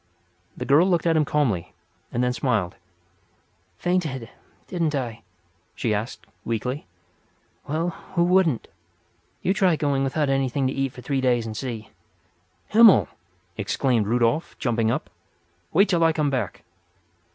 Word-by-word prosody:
The 125 - -4
girl 150 +7 +5
looked 175 -2 +1
at 165 -1 +3
him 155 -1 +3
calmly, 115 - 0 0.4
and 120 - 0
then 125 0 +1
smiled. 110 -9 0 1.0
"Fainted, 155 -10 -1 0.4
didn't 165 -5 -1
I?" 120 -4 -3 0.5
she 110 - 0
asked, 105 +3 -4 0.2
weakly. 125 +5 -3 0.8
"Well, 160 +4 0 0.3
who 170 - +4
wouldn't? 175 -7 +2 0.8
You 190 - +2
try 190 -4 +3
going 140 -3 0
without 145 +2 0
anything 135 0 0
to 130 - 0
eat 135 -1 -1
for 125 - -10
three 135 -2 -1
days 120 -3 +2
and 110 -1 -5
see!" 115 -3 -5 0.8
"Himmel!" 220 -2 +7 0.5
exclaimed 110 +2 0
Rudolf, 120 +6 +1
jumping 115 -4 0
up. - - -1 0.6
"Wait 195 +5 +4
till 170 -3 +2
I 165 0 +4
come 150 -2 0
back." 125 -8 -3
135 Hz, 140 wpm, -24 LUFS, 115-160 Hz, 1.0 s, Himmel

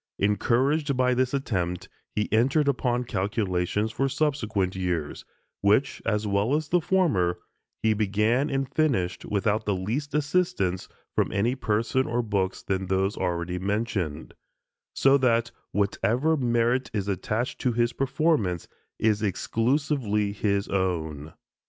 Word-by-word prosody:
Encouraged 130 +8 +1
by 125 0 +3
this 125 0 +1
attempt, 95 -10 -2 0.3
he 105 - 0
entered 135 +7 +3
upon 125 -3 +1
calculations 100 -1 -1
for 135 +4 0
subsequent 125 -10 0
years, 90 -5 -3 0.4
which, 120 +6 +2
as 105 -1 +1
well 105 +6 +1
as 155 -1 -2
the 175 0 +3
former, 115 - +2 0.5
he 110 -1 +4
began 110 +7 +1
and 135 -1 -1
finished 120 - 0
without 105 +1 0
the 100 - +2
least 120 +11 -3
assistance 150 - 0 0.2
from - - +1
any 110 +5 +1
person 115 +1 0
or 120 +1 0
books 100 -4 -1
than 95 -1 -2
those 95 +2 +1
already 90 -1 -2
mentioned; 95 -6 -2 0.6
so 135 +1 +5
that 120 -2 +2 0.2
whatever 115 +9 +1
merit 120 -1 +1
is 100 -2 -1
attached 105 +5 -2
to 125 - +2
his 120 +1 +1
performance 135 - 0 0.3
is 110 -1 +2
exclusively 115 - 0
his 100 -1 0
own. 80 -6 -2
110 Hz, 130 wpm, -26 LUFS, 95-130 Hz, 0.6 s, so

